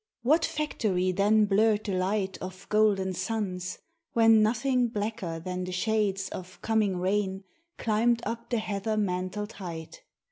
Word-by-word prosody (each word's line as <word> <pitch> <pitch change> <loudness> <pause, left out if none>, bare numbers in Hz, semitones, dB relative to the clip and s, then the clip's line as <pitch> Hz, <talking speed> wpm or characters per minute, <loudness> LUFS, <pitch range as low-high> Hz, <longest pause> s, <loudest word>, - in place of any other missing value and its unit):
What 310 +7 +4
factory 200 - 0
then 210 +3 +4
blurred 210 +1 +3
the 200 - -2
light 190 +1 0
Of 185 +1 -8
golden 205 -3 +3
suns, 185 -4 -3 0.4
when 225 -1 +6
nothing 245 +3 +2
blacker 205 -6 -3
than 180 +2 -4
the 180 - -4
shades 195 0 0
Of 185 0 -8
coming 215 -4 +1
rain 190 +1 0 0.3
climbed 230 +2 +1
up 230 0 -4
the 240 - +1
heather 215 0 -2
mantled 200 +1 -2
height? 170 - -8
205 Hz, 140 wpm, -28 LUFS, 185-220 Hz, 0.4 s, when